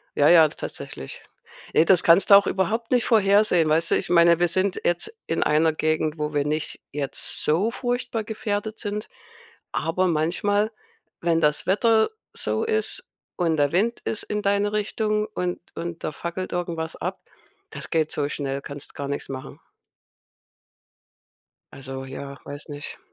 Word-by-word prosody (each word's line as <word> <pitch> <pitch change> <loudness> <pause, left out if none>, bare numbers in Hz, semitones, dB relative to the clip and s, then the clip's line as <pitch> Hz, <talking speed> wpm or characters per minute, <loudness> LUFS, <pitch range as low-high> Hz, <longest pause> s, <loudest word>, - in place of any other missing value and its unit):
ja, 145 - +5
ja, 165 -3 +8
tatsächlich. 65 - -8 0.5
Ne, 160 - +5
das 185 -1 +6
kannst 170 +5 +5
du - - +12
auch 200 0 +6
überhaupt 220 +5 -1
nicht 245 -2 +3
vorhersehen, 200 -6 +4
weißt 165 +2 +2
du? - - +5
Ich - - -2
meine, 170 -1 +5
wir 175 - +3
sind 185 +2 0
jetzt 175 - 0
in - - +1
einer 155 +1 +3
Gegend, 155 0 0
wo 150 0 -3
wir 145 -1 +1
nicht 155 +1 -3
jetzt 140 -1 -3
so 185 +9 +2
furchtbar 245 -2 -2
gefährdet 215 0 -3
sind, 210 0 -3 0.6
aber 185 +3 0
manchmal, 190 +6 +1 0.5
wenn 165 -1 +2
das 150 -1 +2
Wetter 220 +3 +3 0.2
so - - -1
ist 440 -1 -1 0.3
und 165 -3 +1
der 145 -1 +2
Wind 225 +6 +1
ist 220 - -1
in 210 0 -3
deine 200 +1 +1
Richtung 210 0 0
und 180 0 -2 0.2
und 170 0 -6
da - - -2
fackelt 170 +5 -5
irgendwas 170 -2 -3
ab, - - -5 0.5
das - - -7
geht 160 -2 +1
so 145 -1 -1
schnell, 140 -2 -3
kannst 140 0 -8
gar 140 - -4
nix 140 - -4
machen. 130 -1 -7 2.1
Also 135 0 -7
ja, 140 +1 -8
weiß 145 +1 -7
nicht. 145 0 -8
170 Hz, 160 wpm, -24 LUFS, 150-205 Hz, 2.1 s, du